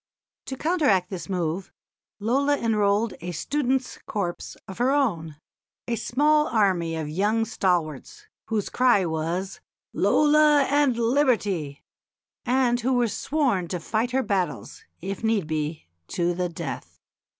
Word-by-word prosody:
To 265 - -5
counteract 285 - +1
this 185 +1 -6
move 180 0 -2 0.5
Lola 275 +7 +1
enrolled 210 -1 +1
a 175 +1 -4
students' 265 - -1
corps 185 -5 -4
of 190 +3 -9
her 245 +2 +3
own 190 - 0 0.5
a 235 - 0
small 300 +6 +2
army 185 -7 +1
of 160 -2 -3
young 205 +8 +1
stalwarts, 175 - -2 0.2
whose 220 -3 -1
cry 245 -7 +3
was 170 +4 -3 0.3
"Lola 300 -1 +4
and 280 -3 +2
Liberty," 225 - 0 0.6
and 245 -1 +2
who 255 +3 0
were 245 -1 +2
sworn 235 - 0
to 180 +1 -3
fight 220 +8 -1
her 260 +1 0
battles, 195 -4 -2 0.2
if 195 +4 -5
need 220 -5 +1
be, 155 0 -3 0.2
to 175 0 0
the 180 0 -2
death. 170 - -7
210 Hz, 130 wpm, -25 LUFS, 175-260 Hz, 0.6 s, Lola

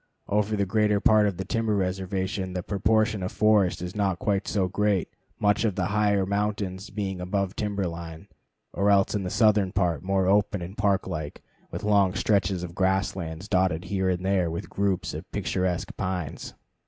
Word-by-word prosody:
Over 105 +1 +1
the 100 -1 +1
greater 105 +1 +2
part 105 0 +5
of 95 -4 -2
the 95 - -4
timber 115 +1 0
reservation 95 0 -2
the 90 -1 -3
proportion 110 +1 +1
of 90 - -3
forest 105 -5 +2
is 90 +2 -6
not 100 -3 0
quite 100 -4 -1
so 95 -3 +1
great, 100 0 +1 0.3
much 105 +1 +2
of 105 -5 0
the 90 - 0
higher 100 -2 +2
mountains 100 -1 -2
being 95 -3 -4
above 95 +1 -2
timber 100 -2 -2
line, 85 -1 -7 0.5
or 100 +1 +1
else 100 -1 +4
in 105 - 0
the 90 - -3
southern 105 -3 +3
part 90 -4 0
more 95 0 +1
open 100 -1 +2
and 90 +4 -8
park 100 -2 +1
like, 80 -5 -5 0.3
with - - -6
long 100 -3 +3
stretches 95 -3 +1
of 85 -1 -6
grass 95 +1 +1
lands 85 0 -6
dotted 90 -4 +1
here 95 0 0
and 90 0 -1
there 95 -3 +2
with 85 +1 -6
groups 100 -2 -1
of - - -8
picturesque 90 -2 -2
pines. 90 -6 -4
95 Hz, 185 wpm, -26 LUFS, 90-105 Hz, 0.5 s, part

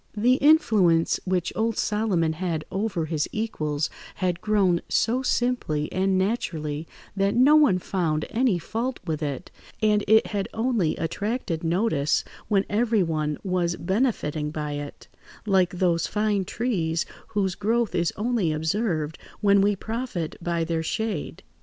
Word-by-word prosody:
The 245 +5 +4
influence 210 - +4
which 180 -2 -1
old 225 0 0
Solomon 200 -7 +1
had 160 -2 -3
over 195 -4 -1
his 155 -1 -1
equals 155 -9 -2 0.3
had 180 -1 -1
grown 195 -5 +2
so 245 +3 +1
simply 245 - 0
and 190 +1 +1
naturally, 165 -7 -2 0.3
that 195 +1 +1
no 265 +5 +6
one 295 -11 +5
found 170 -4 -1
any 230 -4 +2
fault 230 +9 -3
with 160 -3 -2
it, 145 +2 -4 0.3
and 210 -1 +2
it 220 +1 +5
had 200 -2 -3
only 225 -8 +1
attracted 200 0 -3
notice 165 -4 +1 0.2
when 200 -2 +2
everyone 180 -10 +1
was 180 -2 0
benefiting 170 - -1
by 150 -1 -4
it, 145 0 -7 0.4
like 190 -3 +3
those 170 -2 +1
fine 210 -2 0
trees 175 -9 -1 0.3
whose 190 -2 +1
growth 225 +4 0
is 170 -1 +1
only 215 -6 0
observed 160 -1 -1 0.2
when 200 -1 +5
we 205 +1 +3
profit 220 -6 -4
by 170 -1 0
their 165 0 -1
shade. 220 +7 -3
190 Hz, 140 wpm, -25 LUFS, 165-220 Hz, 0.4 s, no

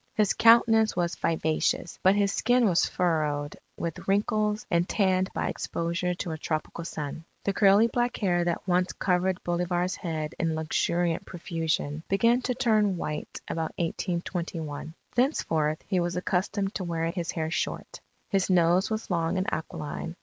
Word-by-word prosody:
His 210 -3 +3
countenance 225 -1 +5
was 175 -1 0
vivacious; 160 +1 0
but 190 +2 +5
his 200 -1 +2
skin 245 +1 +3
was 175 -3 +3
furrowed 150 -4 0 0.2
with 165 -2 -5
wrinkles 210 +2 +1
and 170 0 +2
tanned 190 -2 +2
by - - -1
exposure 170 +1 -2
to 175 - -4
a 160 - -5
tropical 155 +2 -3
sun. 150 0 -5 0.2
The 200 - 0
curly 200 +2 +5
black 240 +1 0
hair 175 -4 +1
that 175 +2 -2
once 180 0 +2
covered 180 0 0
Bolivar's 175 +1 0
head 160 -3 -4
in 165 -1 0
luxuriant 165 +2 0
profusion, 160 -3 -2
began 230 +5 +3
to 250 0 -1
turn 215 -6 +2
white 150 -2 -5
about 160 -1 -3
1821. 170 -3 -3 0.2
Thenceforth, 160 - +1
he 190 -3 +1
was 175 0 -1
accustomed 195 +2 -1
to 190 - -3
wear 165 -1 -1
his 170 -2 -4
hair 160 -1 -2
short. - - -3 0.3
His 195 -2 +1
nose 180 +1 +3
was 220 -2 -3
long 170 +1 0
and 185 - 0
aquiline. 160 +1 -5
175 Hz, 155 wpm, -27 LUFS, 165-200 Hz, 0.3 s, countenance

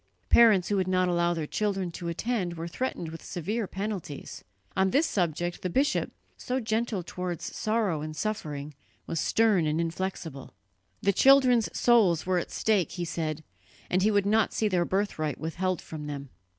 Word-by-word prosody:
Parents 215 -6 +6
who 205 - +1
would 185 -1 +1
not 185 0 +2
allow 175 0 +2
their 160 -2 -2
children 195 0 -1
to 170 +1 -6
attend 180 0 -2
were 165 0 -5
threatened 170 -3 -3
with 165 +1 -9
severe 205 +6 -3
penalties; 195 -7 -5 0.3
on 190 0 +3
this 285 - +3
subject 175 - -1
the 185 - -2
bishop, 275 - +1 0.3
so 255 +1 -2
gentle 220 -4 -1
towards 180 0 -5
sorrow 215 -8 0
and 155 0 -5
suffering, 150 -7 -4 0.3
was 165 - -2
stern 205 -4 +3
and 155 +1 0
inflexible. 165 -4 -4 0.5
The 200 - +3
children's 255 -1 +5
souls 205 -9 +4
were 185 -1 +2
at - - -5
stake, 205 -6 +1
he 175 -2 -3
said, 155 -2 -3 0.5
and 185 - +3
he 210 - +4
would 205 -2 +2
not 215 +2 +2
see 220 - +1
their 180 -4 +1
birthright 185 -7 -1
withheld 175 +3 -2
from 150 -2 -7
them. 140 -2 -6
185 Hz, 170 wpm, -28 LUFS, 165-215 Hz, 0.5 s, Parents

